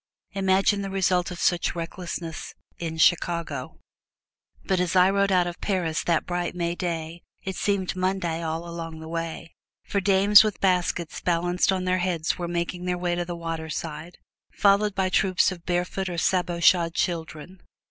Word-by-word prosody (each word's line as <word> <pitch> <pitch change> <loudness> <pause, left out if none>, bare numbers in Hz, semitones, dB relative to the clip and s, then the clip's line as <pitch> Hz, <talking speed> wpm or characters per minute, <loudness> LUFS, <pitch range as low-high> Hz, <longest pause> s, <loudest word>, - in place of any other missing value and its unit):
Imagine 195 +1 +2
the 195 - -4
result 185 -2 +1
of 180 -1 -7
such 175 -1 +1
recklessness 170 -1 -6 0.2
in 160 -1 -4
Chicago! 165 -4 +1 0.9
But 190 -1 +1
as 180 0 0
I 185 +1 +6
rode 200 0 +2
out 180 -2 +4
of 175 0 -6
Paris 175 -6 -1
that 170 -2 +1
bright 175 0 -2
May 170 -1 -1
day 170 -2 -4 0.2
it 190 -1 -4
seemed 195 -2 -1
Monday 185 -3 -1
all 165 +1 -3
along 165 -1 -6
the 160 - -9
way; 165 0 -5 0.3
for 200 - -1
dames 200 +2 +7
with 215 -2 -2
baskets 180 -3 0
balanced 175 +2 +1
on 185 -1 -1
their 185 0 +1
heads 175 -3 0
were 175 - -2
making 175 +1 -3
their 180 0 -1
way 175 0 -1
to 175 0 -2
the 175 0 -5
waterside, 165 0 -5 0.3
followed 205 0 +3
by 190 -1 +1
troops 185 0 +2
of 175 -2 -10
barefoot 180 +2 -1
or 175 - -4
sabot 175 -1 0
shod 170 -2 +4
children. 165 +1 -3
175 Hz, 170 wpm, -25 LUFS, 170-185 Hz, 0.9 s, dames